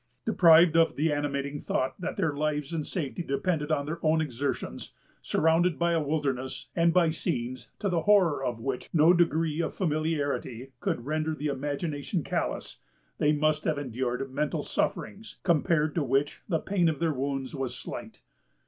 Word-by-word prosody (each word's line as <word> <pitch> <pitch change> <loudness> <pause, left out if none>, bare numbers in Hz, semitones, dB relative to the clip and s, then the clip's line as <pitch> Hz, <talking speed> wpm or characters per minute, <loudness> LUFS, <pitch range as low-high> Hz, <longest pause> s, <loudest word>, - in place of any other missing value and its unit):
Deprived 165 -1 +6
of 165 0 +4
the 155 +1 +1
animating 145 0 -2
thought 130 +7 -2
that - - -4
their 165 -7 0
lives 150 0 -1
and 155 -3 -2
safety 170 -1 -3
depended 155 0 -1
on 140 -2 +1
their 165 +3 -4
own 160 0 +3
exertions; 140 -2 -3 0.3
surrounded 165 - +2
by 170 0 +2
a 165 -1 +2
wilderness, 140 -4 -2
and 170 0 +4
by 170 -2 +4
scenes 130 -6 -3
to 205 - -2
the 175 -3 +1
horror 185 -9 +4
of 120 -3 -2
which 125 +2 -4
no 165 +1 +6
degree 165 -2 +2
of 160 - -3
familiarity 150 - -2
could 120 - -2
render 155 +1 -1
the 150 - -6
imagination 145 +4 -2
callous, - - -3 0.4
they 150 - +4
must 155 0 +1
have 155 -2 +1
endured 130 -1 -2
mental 150 +2 -1
sufferings, 220 +2 -3
compared 155 -3 +2
to 165 - 0
which 135 +2 0
the 165 - +2
pain 175 0 +1
of 155 - -2
their 165 0 0
wounds 135 0 -3
was 135 -3 -3
slight. - - -8
150 Hz, 165 wpm, -28 LUFS, 140-165 Hz, 0.4 s, Deprived